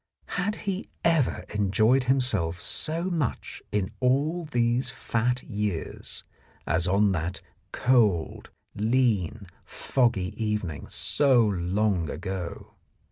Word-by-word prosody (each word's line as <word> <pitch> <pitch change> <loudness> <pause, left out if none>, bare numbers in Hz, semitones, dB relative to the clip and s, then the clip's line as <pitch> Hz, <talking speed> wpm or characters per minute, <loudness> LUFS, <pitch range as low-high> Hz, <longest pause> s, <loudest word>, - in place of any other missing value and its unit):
Had 200 +4 -1
he 195 -1 -3 0.2
ever 165 -7 +2
enjoyed 110 +5 +3
himself 110 -11 +1
so 160 - -3
much 170 -8 -2
in 105 0 -1
all 145 +7 +1
these 120 -3 +1
fat 125 +2 -1
years 105 -6 -4 0.4
as 85 +2 +2
on 100 +2 +3
that 90 0 -2 0.3
cold, 110 -10 +2 0.2
lean, 110 -3 +1 0.2
foggy 115 -7 0
evening 100 -9 -2
so 135 -4 +3
long 95 -2 0
ago 90 +2 -5
110 Hz, 100 wpm, -27 LUFS, 95-130 Hz, 0.4 s, enjoyed